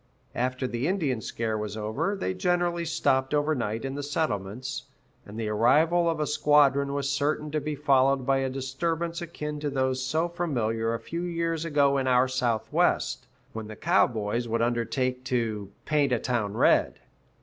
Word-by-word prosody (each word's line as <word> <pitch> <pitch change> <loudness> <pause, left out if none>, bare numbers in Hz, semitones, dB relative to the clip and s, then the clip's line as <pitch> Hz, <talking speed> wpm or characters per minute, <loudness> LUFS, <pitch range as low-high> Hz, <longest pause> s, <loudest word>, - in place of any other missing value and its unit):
After 130 +1 -1
the 125 +2 -2
Indian 155 - 0
scare 110 -1 -2
was 105 0 -4
over, 110 - -1
they 95 - -2
generally 175 - 0
stopped 135 -3 +1
over 150 +1 +2
night 115 -3 -2
in 135 - -3
the 145 - -4
settlements, 130 -5 -3 0.4
and 105 +2 -8
the 110 - -2
arrival 155 +11 +3
of 165 -2 -1
a 150 - +1
squadron 140 -1 +3
was 140 -1 -1
certain 145 +2 -1
to 155 0 -1
be 150 +1 -3
followed 135 -2 +3
by 135 +1 +3
a 135 0 0
disturbance 165 +6 -2
akin 150 -3 -5
to 145 0 -2
those 130 -1 0
so 155 +6 0
familiar 115 -10 -1
a - - -4
few 165 +9 -5
years 165 -2 -2
ago 140 -3 +3
in 130 - -1
our 125 0 +4
Southwest, 120 -4 0 0.3
when 110 -1 -6
the 110 - -8
cowboys 120 - +1
would 115 0 0
undertake 120 +2 -1
to 115 -6 -1 0.2
"paint 145 -3 +2
a 125 - +3
town 110 -4 -2
red." - - +3
135 Hz, 170 wpm, -27 LUFS, 115-150 Hz, 0.4 s, our